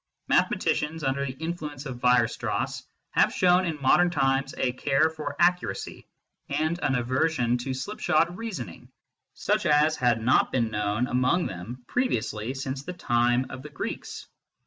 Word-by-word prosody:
Mathematicians, 155 Hz, +1 st, +1 dB
under 135 Hz, +1 st, 0 dB
the 130 Hz, -, -4 dB
influence 150 Hz, -1 st, -5 dB
of 130 Hz, -3 st, -6 dB
Weierstrass, 125 Hz, -2 st, +1 dB, 0.3 s
have -, -, +3 dB
shown 180 Hz, 0 st, +3 dB
in 160 Hz, -4 st, -3 dB
modern 175 Hz, +6 st, +4 dB
times 135 Hz, -3 st, 0 dB
a 125 Hz, -, +1 dB
care 140 Hz, +4 st, +1 dB
for 150 Hz, -2 st, -5 dB
accuracy, 180 Hz, +1 st, 0 dB, 0.4 s
and 155 Hz, +4 st, 0 dB
an 135 Hz, -5 st, +1 dB
aversion 125 Hz, 0 st, +1 dB
to 130 Hz, +1 st, -3 dB
slipshod 170 Hz, +1 st, 0 dB
reasoning, 180 Hz, -, -7 dB, 0.5 s
such -, -, 0 dB
as 150 Hz, +1 st, +4 dB
had 120 Hz, -2 st, +2 dB
not 120 Hz, +3 st, +3 dB
been 115 Hz, -3 st, 0 dB
known 105 Hz, +2 st, 0 dB
among 130 Hz, +8 st, +1 dB
them 110 Hz, +8 st, -7 dB
previously 120 Hz, -, -1 dB
since 135 Hz, 0 st, -4 dB
the 180 Hz, +6 st, -6 dB
time 120 Hz, -4 st, +1 dB
of 130 Hz, -, -7 dB
the 150 Hz, -, -9 dB
Greeks. 145 Hz, -, -6 dB
135 Hz, 145 wpm, -26 LUFS, 125-160 Hz, 0.5 s, modern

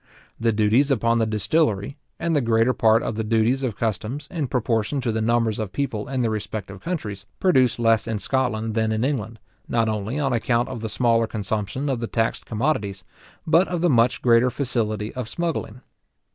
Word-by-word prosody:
The 115 Hz, 0 st, +2 dB
duties 110 Hz, +6 st, +3 dB
upon 115 Hz, -3 st, +2 dB
the 110 Hz, -, +1 dB
distillery, 110 Hz, -, 0 dB, 0.2 s
and 170 Hz, -1 st, -1 dB
the 145 Hz, -, +3 dB
greater 115 Hz, +1 st, +2 dB
part 110 Hz, -1 st, +3 dB
of -, -, -2 dB
the 110 Hz, -, -1 dB
duties 115 Hz, +4 st, +2 dB
of 120 Hz, -6 st, -2 dB
customs, 115 Hz, +6 st, -3 dB
in 155 Hz, -6 st, -2 dB
proportion 120 Hz, +1 st, 0 dB
to 120 Hz, -2 st, -1 dB
the 110 Hz, 0 st, -1 dB
numbers 115 Hz, -1 st, +1 dB
of 105 Hz, -4 st, -3 dB
people 120 Hz, -5 st, -3 dB
in 130 Hz, -2 st, -1 dB
the 115 Hz, -, +1 dB
respective 105 Hz, -2 st, -5 dB
countries, 105 Hz, -, -4 dB
produce 130 Hz, -10 st, +3 dB
less 115 Hz, -2 st, +2 dB
in 110 Hz, -1 st, -1 dB
Scotland 115 Hz, -2 st, -1 dB
than 110 Hz, 0 st, +1 dB
in 110 Hz, +1 st, 0 dB
England, 120 Hz, -5 st, -2 dB, 0.3 s
not 115 Hz, -1 st, +1 dB
only 110 Hz, +4 st, -2 dB
on 135 Hz, -3 st, 0 dB
account 120 Hz, +1 st, +1 dB
of 125 Hz, -4 st, -6 dB
the 110 Hz, -, -3 dB
smaller 115 Hz, 0 st, +2 dB
consumption 105 Hz, +5 st, -3 dB
of 130 Hz, -4 st, 0 dB
the 115 Hz, -, -3 dB
taxed 115 Hz, 0 st, -1 dB
commodities, 105 Hz, -6 st, -1 dB, 0.4 s
but 165 Hz, +4 st, +4 dB
of 175 Hz, -2 st, -2 dB
the 175 Hz, -2 st, +3 dB
much 120 Hz, -1 st, +2 dB
greater 120 Hz, +1 st, +5 dB
facility 110 Hz, -5 st, -2 dB
of 125 Hz, -3 st, -5 dB
smuggling. 160 Hz, -8 st, -3 dB
115 Hz, 190 wpm, -23 LUFS, 110-130 Hz, 0.4 s, greater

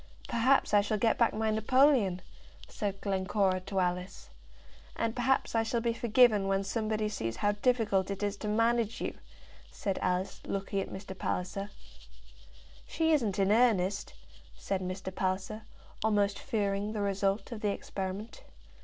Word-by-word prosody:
"Perhaps 255 Hz, +2 st, +2 dB
I 205 Hz, -, +7 dB
shall 210 Hz, +1 st, -1 dB
get 225 Hz, +1 st, +2 dB
back 235 Hz, -, +4 dB
my 220 Hz, 0 st, 0 dB
napoleon," 220 Hz, -4 st, +3 dB, 0.4 s
said 200 Hz, -4 st, -4 dB
Glencora 190 Hz, -1 st, +1 dB
to 195 Hz, +1 st, -3 dB
Alice. 180 Hz, +1 st, -3 dB, 0.6 s
"And 230 Hz, 0 st, -1 dB
perhaps 260 Hz, +2 st, +1 dB
I 225 Hz, -, +3 dB
shall 225 Hz, +1 st, -1 dB
be 230 Hz, 0 st, 0 dB
forgiven 230 Hz, -3 st, +4 dB
when 195 Hz, 0 st, +1 dB
somebody 215 Hz, +1 st, -1 dB
sees 115 Hz, -, -3 dB
how 205 Hz, -, +1 dB
difficult 205 Hz, -4 st, +1 dB
it 200 Hz, +1 st, -4 dB
is 205 Hz, 0 st, 0 dB
to 210 Hz, -, -5 dB
manage 230 Hz, +1 st, +1 dB
you," -, -, -3 dB, 0.6 s
said 195 Hz, -2 st, -3 dB
Alice, 180 Hz, +1 st, -1 dB
looking 195 Hz, 0 st, -2 dB
at 195 Hz, -, -3 dB
Mr. 190 Hz, 0 st, -7 dB
Palliser. 185 Hz, +2 st, -3 dB, 1.2 s
"She 320 Hz, 0 st, +1 dB
isn't 230 Hz, -10 st, +1 dB
in 195 Hz, 0 st, +2 dB
earnest," 205 Hz, -4 st, +2 dB, 0.4 s
said 195 Hz, -1 st, -3 dB
Mr. 185 Hz, +1 st, -5 dB
Palliser, 190 Hz, +4 st, -2 dB, 0.4 s
almost 205 Hz, -2 st, +2 dB
fearing 205 Hz, -4 st, -1 dB
the 210 Hz, -, -2 dB
result 200 Hz, +2 st, 0 dB
of 225 Hz, -3 st, -6 dB
the 210 Hz, -, +1 dB
experiment. 195 Hz, +2 st, -5 dB
205 Hz, 150 wpm, -30 LUFS, 195-225 Hz, 1.2 s, I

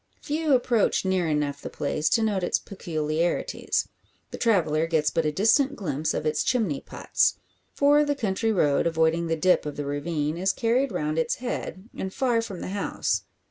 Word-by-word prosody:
Few 305 Hz, -1 st, +1 dB
approach 240 Hz, -5 st, +1 dB
near 185 Hz, -2 st, +1 dB
enough 150 Hz, -2 st, -1 dB
the -, -, -6 dB
place 150 Hz, +1 st, -1 dB
to 225 Hz, -, +2 dB
note 205 Hz, -3 st, 0 dB
its 175 Hz, -, +1 dB
peculiarities. 165 Hz, -3 st, -2 dB, 0.4 s
The -, -, -7 dB
traveller 165 Hz, -8 st, +2 dB
gets 155 Hz, -2 st, +1 dB
but 165 Hz, -2 st, 0 dB
a -, -, +1 dB
distant 245 Hz, -, +3 dB
glimpse 155 Hz, -, -2 dB
of -, -, -3 dB
its 150 Hz, -1 st, +1 dB
chimney 215 Hz, -, 0 dB
pots; -, -, 0 dB, 0.4 s
for 290 Hz, +1 st, +5 dB
the 290 Hz, -1 st, 0 dB
country 225 Hz, -2 st, 0 dB
road, 150 Hz, -7 st, +2 dB
avoiding 165 Hz, +1 st, +1 dB
the 165 Hz, -, +1 dB
dip 180 Hz, +3 st, +3 dB
of 150 Hz, -1 st, -5 dB
the 145 Hz, -, -4 dB
ravine, 150 Hz, +2 st, -2 dB
is 190 Hz, +2 st, +1 dB
carried 245 Hz, +3 st, +1 dB
round 155 Hz, -3 st, -1 dB
its 160 Hz, -, 0 dB
head, 230 Hz, -5 st, -5 dB
and 190 Hz, -, -4 dB
far 245 Hz, 0 st, +1 dB
from 200 Hz, -6 st, -7 dB
the -, -, -5 dB
house. 200 Hz, +1 st, -1 dB
180 Hz, 180 wpm, -26 LUFS, 155-230 Hz, 0.4 s, for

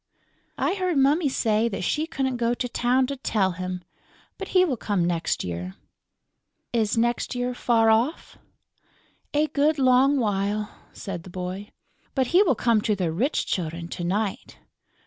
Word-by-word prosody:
"I -, -, +1 dB
heard 365 Hz, -5 st, -1 dB
Mummy 285 Hz, +3 st, +3 dB
say 225 Hz, -2 st, +1 dB
that 195 Hz, -3 st, -4 dB
she 310 Hz, -, 0 dB
couldn't 265 Hz, -5 st, -2 dB
go 235 Hz, 0 st, +1 dB
to 245 Hz, -, -2 dB
town 250 Hz, +2 st, +2 dB
to 280 Hz, +2 st, -4 dB
tell 205 Hz, -7 st, +1 dB
him. 180 Hz, 0 st, -5 dB, 0.6 s
But 390 Hz, -, -5 dB
he 370 Hz, -1 st, +4 dB
will 285 Hz, -7 st, -1 dB
come 205 Hz, -6 st, -1 dB
next 170 Hz, -1 st, -1 dB
year." 90 Hz, +1 st, -5 dB, 1.0 s
"Is 225 Hz, -2 st, +1 dB
next 240 Hz, +2 st, 0 dB
year 245 Hz, 0 st, -1 dB
far 225 Hz, -2 st, +3 dB
off?" 240 Hz, +9 st, 0 dB, 1.0 s
"A 300 Hz, +1 st, +4 dB
good 300 Hz, +1 st, +1 dB
long 265 Hz, +1 st, +4 dB
while," 210 Hz, -2 st, -1 dB, 0.2 s
said 180 Hz, -4 st, -6 dB
the 185 Hz, -, -12 dB
boy. 185 Hz, +3 st, -5 dB, 0.5 s
"But 265 Hz, -2 st, +2 dB
he 365 Hz, -, +7 dB
will 335 Hz, -11 st, +3 dB
come 230 Hz, -1 st, +2 dB
to 210 Hz, 0 st, +1 dB
the 180 Hz, -4 st, -1 dB
rich 245 Hz, -, 0 dB
children 170 Hz, -1 st, -3 dB
to 175 Hz, -, -5 dB
night." 205 Hz, +5 st, -2 dB
230 Hz, 165 wpm, -25 LUFS, 190-270 Hz, 1.0 s, he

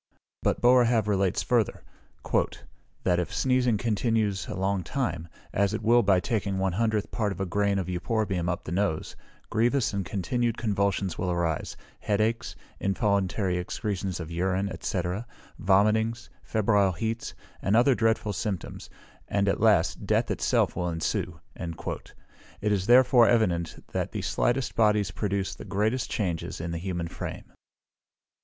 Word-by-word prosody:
But -, -, +1 dB
Boerhaave 120 Hz, -3 st, +4 dB
relates 95 Hz, -3 st, +1 dB
further, -, -, +1 dB, 1.2 s
"That 90 Hz, -1 st, +2 dB
if 90 Hz, -, -2 dB
sneezing 125 Hz, -3 st, +2 dB
continues 110 Hz, -3 st, 0 dB
a -, -, -5 dB
long 95 Hz, +1 st, 0 dB
time, 85 Hz, -, -3 dB, 0.3 s
as 100 Hz, +1 st, +1 dB
it 110 Hz, -, -5 dB
will 120 Hz, +2 st, +5 dB
by 100 Hz, -4 st, +4 dB
taking 100 Hz, 0 st, -1 dB
one 95 Hz, 0 st, +1 dB
hundredth 110 Hz, +2 st, 0 dB
part 105 Hz, -3 st, 0 dB
of 95 Hz, -, -6 dB
a 95 Hz, -, 0 dB
grain 100 Hz, +2 st, +1 dB
of 95 Hz, -, -1 dB
euphorbium 90 Hz, 0 st, -1 dB
up 90 Hz, -, -2 dB
the -, -, -7 dB
nose, 90 Hz, -3 st, -1 dB, 0.4 s
grievous 120 Hz, +2 st, +2 dB
and 100 Hz, -1 st, -1 dB
continued 115 Hz, +6 st, -1 dB
convulsions 100 Hz, -4 st, 0 dB
will 90 Hz, -, -1 dB
arise, 85 Hz, -3 st, -1 dB, 0.2 s
head 105 Hz, -1 st, 0 dB
aches, 115 Hz, +2 st, 0 dB, 0.2 s
involuntary 100 Hz, -2 st, 0 dB
excretions 95 Hz, 0 st, -3 dB
of 80 Hz, -1 st, -6 dB
urine, 95 Hz, +3 st, -1 dB
&c., 90 Hz, -, -1 dB, 0.6 s
vomitings, 110 Hz, +5 st, +2 dB
febrile 100 Hz, -3 st, +2 dB
heats, 115 Hz, +6 st, -3 dB, 0.3 s
and 100 Hz, -, +2 dB
other 125 Hz, +4 st, +5 dB
dreadful 110 Hz, -2 st, +1 dB
symptoms; 100 Hz, -7 st, -4 dB, 0.4 s
and, 100 Hz, 0 st, +1 dB
at 100 Hz, -, +1 dB
last, 105 Hz, -7 st, +3 dB
death -, -, +2 dB
itself -, -, +1 dB
will 90 Hz, 0 st, -1 dB
ensue." 80 Hz, 0 st, -2 dB, 0.2 s
It 85 Hz, +4 st, -6 dB
is 100 Hz, -2 st, 0 dB
therefore 125 Hz, -1 st, +6 dB
evident 90 Hz, -8 st, +1 dB
that -, -, -2 dB
the -, -, -3 dB
slightest 125 Hz, +1 st, 0 dB
bodies 105 Hz, -4 st, +3 dB
produce 100 Hz, -1 st, -2 dB
the -, -, -10 dB
greatest 110 Hz, +5 st, -1 dB
changes 90 Hz, -6 st, -2 dB
in 85 Hz, +1 st, -4 dB
the 85 Hz, -, -3 dB
human 85 Hz, -2 st, -3 dB
frame. -, -, -7 dB
100 Hz, 150 wpm, -27 LUFS, 90-110 Hz, 1.2 s, therefore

